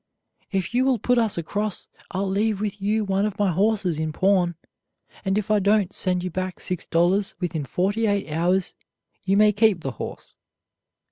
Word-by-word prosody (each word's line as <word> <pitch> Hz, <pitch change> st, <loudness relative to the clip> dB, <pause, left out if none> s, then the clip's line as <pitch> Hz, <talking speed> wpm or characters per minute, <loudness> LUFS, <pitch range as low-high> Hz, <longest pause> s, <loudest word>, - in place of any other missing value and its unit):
"If 190 Hz, +2 st, -2 dB
you 250 Hz, +1 st, +3 dB
will 265 Hz, -2 st, +2 dB
put 245 Hz, +1 st, +2 dB
us 225 Hz, -5 st, 0 dB
across, 205 Hz, +5 st, -3 dB, 0.2 s
I'll 195 Hz, +1 st, -2 dB
leave 205 Hz, +2 st, 0 dB
with 205 Hz, -1 st, -3 dB
you 210 Hz, +2 st, +1 dB
one 195 Hz, 0 st, +1 dB
of 210 Hz, -2 st, -2 dB
my 205 Hz, -3 st, +2 dB
horses 195 Hz, -3 st, +1 dB
in 155 Hz, 0 st, -1 dB
pawn, 180 Hz, 0 st, +2 dB, 0.7 s
and 195 Hz, +1 st, 0 dB
if 215 Hz, 0 st, -1 dB
I 210 Hz, -, +4 dB
don't 200 Hz, -1 st, +2 dB
send 180 Hz, -2 st, 0 dB
you 185 Hz, -, -3 dB
back 185 Hz, 0 st, -4 dB
six 180 Hz, -2 st, -3 dB
dollars 180 Hz, +4 st, +2 dB
within 170 Hz, -5 st, -2 dB
forty 205 Hz, -, 0 dB
eight 200 Hz, -3 st, 0 dB
hours 175 Hz, +4 st, 0 dB, 0.5 s
you 195 Hz, +1 st, +2 dB
may 210 Hz, 0 st, +6 dB
keep 205 Hz, -4 st, +3 dB
the 135 Hz, -, -3 dB
horse." 120 Hz, -, -8 dB
195 Hz, 185 wpm, -24 LUFS, 180-210 Hz, 0.7 s, may